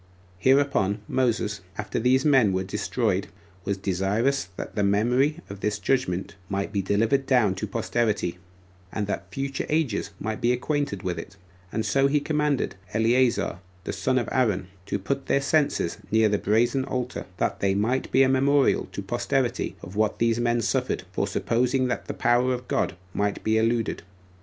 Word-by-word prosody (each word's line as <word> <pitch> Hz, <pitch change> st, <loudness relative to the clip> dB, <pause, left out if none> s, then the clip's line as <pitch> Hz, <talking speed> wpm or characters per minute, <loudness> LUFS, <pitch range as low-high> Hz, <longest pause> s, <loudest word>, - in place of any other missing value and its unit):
Hereupon 130 Hz, -6 st, +3 dB
Moses, 115 Hz, -6 st, 0 dB, 0.2 s
after 105 Hz, -, -2 dB
these 130 Hz, +4 st, +3 dB
men 130 Hz, -9 st, +5 dB
were 95 Hz, 0 st, 0 dB
destroyed, 100 Hz, 0 st, -1 dB, 0.4 s
was 100 Hz, 0 st, -1 dB
desirous 100 Hz, +6 st, 0 dB
that -, -, -6 dB
the 105 Hz, -, -1 dB
memory 125 Hz, +10 st, +2 dB
of 100 Hz, 0 st, -8 dB
this 105 Hz, +1 st, -1 dB
judgment 95 Hz, -10 st, -1 dB, 0.2 s
might 100 Hz, +1 st, -2 dB
be 100 Hz, -, +1 dB
delivered 115 Hz, +8 st, +1 dB
down 120 Hz, -7 st, +4 dB
to -, -, -4 dB
posterity, 105 Hz, -7 st, -1 dB, 0.5 s
and 105 Hz, -, -2 dB
that 100 Hz, -, -4 dB
future 135 Hz, 0 st, -3 dB
ages 150 Hz, -11 st, 0 dB
might 110 Hz, +2 st, -3 dB
be 120 Hz, 0 st, +3 dB
acquainted 140 Hz, -, -2 dB
with 90 Hz, -3 st, -2 dB
it; 95 Hz, +3 st, -10 dB, 0.3 s
and 110 Hz, 0 st, -2 dB
so 135 Hz, +7 st, +3 dB
he 145 Hz, +2 st, +2 dB
commanded 150 Hz, -2 st, 0 dB, 0.2 s
Eleazar, 120 Hz, +2 st, +2 dB, 0.2 s
the -, -, -4 dB
son 130 Hz, 0 st, 0 dB
of 120 Hz, -, 0 dB
Aaron, 105 Hz, -8 st, +1 dB, 0.2 s
to -, -, -1 dB
put 135 Hz, +8 st, -3 dB
their -, -, +3 dB
censers 140 Hz, -, +1 dB
near 110 Hz, +1 st, +4 dB
the 105 Hz, -1 st, +1 dB
brazen 120 Hz, +5 st, +2 dB
altar, 125 Hz, -1 st, -4 dB
that -, -, -1 dB
they 95 Hz, -1 st, +1 dB
might 115 Hz, +6 st, 0 dB
be 135 Hz, -, +5 dB
a -, -, +4 dB
memorial 135 Hz, +1 st, +3 dB
to -, -, -4 dB
posterity -, -, -1 dB
of 90 Hz, +3 st, -9 dB
what 110 Hz, 0 st, +1 dB
these 115 Hz, 0 st, +2 dB
men 120 Hz, 0 st, +1 dB
suffered, 125 Hz, -2 st, -1 dB
for 100 Hz, +1 st, -1 dB
supposing 125 Hz, +5 st, +1 dB
that -, -, -3 dB
the -, -, -4 dB
power 125 Hz, +2 st, +2 dB
of 125 Hz, 0 st, -9 dB
God -, -, 0 dB, 0.2 s
might 100 Hz, 0 st, -1 dB
be 110 Hz, -, +2 dB
eluded. 115 Hz, 0 st, 0 dB
115 Hz, 170 wpm, -25 LUFS, 100-130 Hz, 0.5 s, men